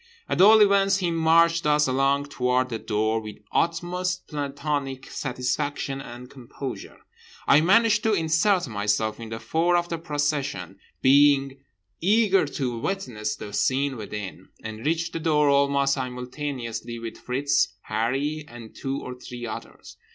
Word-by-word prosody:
At - - +1
all 215 +2 +8
events 195 -1 +4
he 180 -3 -1
marched 165 0 +3
us 150 0 +4
along 135 +2 +1
toward 125 -2 0
the 115 -2 -4
door 110 +1 0
with 105 -1 -8 0.2
utmost 175 +2 -1
plantonic 140 -2 -3
satisfaction 135 +1 -2
and 120 -1 -10
composure. 125 -3 -8 0.4
I 145 - +6
managed 215 +5 +4
to 220 - +3
insert 170 +2 +2
myself 105 0 -1
in 115 -1 -8
the 115 0 -5
fore 170 +6 +1
of 175 0 -2
the 170 - -3
procession, 145 - -2 0.2
being 140 0 +4 0.4
eager 195 -2 +3
to 125 -4 -3
witness 115 - -3
the 105 -1 -9
scene 135 +4 +1
within; 105 -4 -7
and 110 0 -7
reached 165 +2 -1
the - - -3
door 150 -2 +2
almost 140 0 +3
simultaneously 125 -2 -5
with 115 -1 -7
Fritz, 130 -5 0
Harree 135 +8 -1
and 120 -2 -12
two 135 0 -3
or 125 - -6
three 125 -1 -8
others. 110 - -9
140 Hz, 145 wpm, -25 LUFS, 120-165 Hz, 0.4 s, all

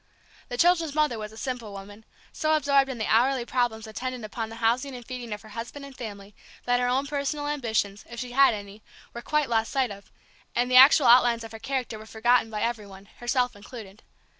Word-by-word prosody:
The 245 - -4
children's 330 -1 +3
mother 300 -7 +1
was 210 0 -6
a 220 - -14
simple 240 -4 -5
woman; 205 +2 -11 0.3
so 310 0 +1
absorbed 280 -2 +3
in 260 - -4
the 220 - -2
hourly 245 +2 +2
problems 240 -3 -1
attendant 245 +2 -5
upon 220 +1 -5
the 225 - -9
housing 240 +4 0
and 245 -1 -10
feeding 245 -2 -7
of 210 +1 -5
her 215 - -13
husband 235 +6 -7
and 275 -1 -12
family 205 -4 -8 0.3
that 245 0 +2
her 245 - +1
own 260 +3 +1
personal 290 +1 -3
ambitions, 220 -8 -1
if 235 0 -8
she 250 0 -5
had 270 -2 +5
any, 205 +1 -10 0.3
were 235 - -6
quite 300 +2 0
lost 225 -1 0
sight 265 -5 0
of, 200 0 -12 0.4
and 245 +1 +1
the - - +3
actual 270 +2 +8
outlines 240 -1 +5
of 225 - -9
her 225 - -9
character 250 -3 -3
were 215 - -12
forgotten 230 +1 +2
by 210 -1 -3
every 230 -3 -2
one, 195 0 -14
herself 245 0 0
included. 205 -1 -11
240 Hz, 215 wpm, -26 LUFS, 220-265 Hz, 0.4 s, actual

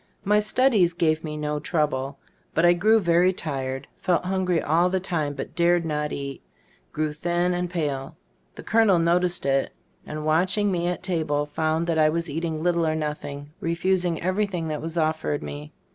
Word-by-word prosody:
My 210 +2 +3
studies 210 -5 +3
gave 160 -1 +1
me 150 -1 -5
no 150 0 -2
trouble, 145 -4 -1 0.4
but 165 - +4
I 175 - +7
grew 215 +6 +4
very 175 -1 +3
tired, 135 -6 -4
felt 180 -1 +1
hungry 185 -2 +1
all 170 +4 +2
the 190 +1 0
time 155 -6 -2
but - - -6
dared 170 0 +3
not 150 -1 -2
eat, 140 -1 -5 0.5
grew 155 -1 -1
thin 175 +3 0
and 180 0 -2
pale. 145 -6 -3 0.4
The - - -9
colonel 220 -4 +4
noticed 175 0 +1
it, 135 0 +1 0.3
and 150 0 -5
watching 185 +6 +2
me 175 -1 0
at 180 +1 -3
table 155 -5 0
found 155 +2 -1
that 165 -2 0
I 155 0 +5
was 165 0 -2
eating 160 0 -3
little 170 -2 +2
or 155 - +1
nothing, 150 -2 -5
refusing 175 0 0
everything 185 -3 -1
that 150 -1 -3
was 165 +2 -5
offered 155 -2 0
me. 75 +1 -7
165 Hz, 175 wpm, -25 LUFS, 150-180 Hz, 0.5 s, I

